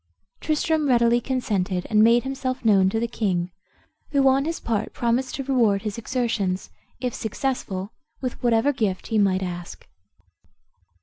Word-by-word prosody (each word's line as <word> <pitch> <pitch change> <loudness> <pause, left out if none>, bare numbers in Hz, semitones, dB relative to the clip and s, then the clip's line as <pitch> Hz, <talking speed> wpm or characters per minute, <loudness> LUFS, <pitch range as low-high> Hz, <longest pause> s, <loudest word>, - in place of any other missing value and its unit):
Tristram 310 0 0
readily 240 -1 +4
consented, 200 -8 -1
and 215 -1 +4
made 235 +1 +5
himself 265 -2 -3
known 195 -3 +5
to 225 - -1
the 235 - 0
king, 185 -6 -1 0.6
who 275 -2 +3
on 270 +1 +3
his 330 +1 -2
part 220 -2 -2
promised 240 +2 0
to 275 - -4
reward 230 -7 +2
his 210 +1 -4
exertions, 220 -6 -2 0.3
if 250 -2 -2
successful, 215 -4 -3 0.3
with 255 -2 -5
whatever 240 +4 +3
gift 200 -7 -1
he 220 - +2
might 190 -2 +2
ask. 175 -1 -7
230 Hz, 145 wpm, -24 LUFS, 200-260 Hz, 0.6 s, made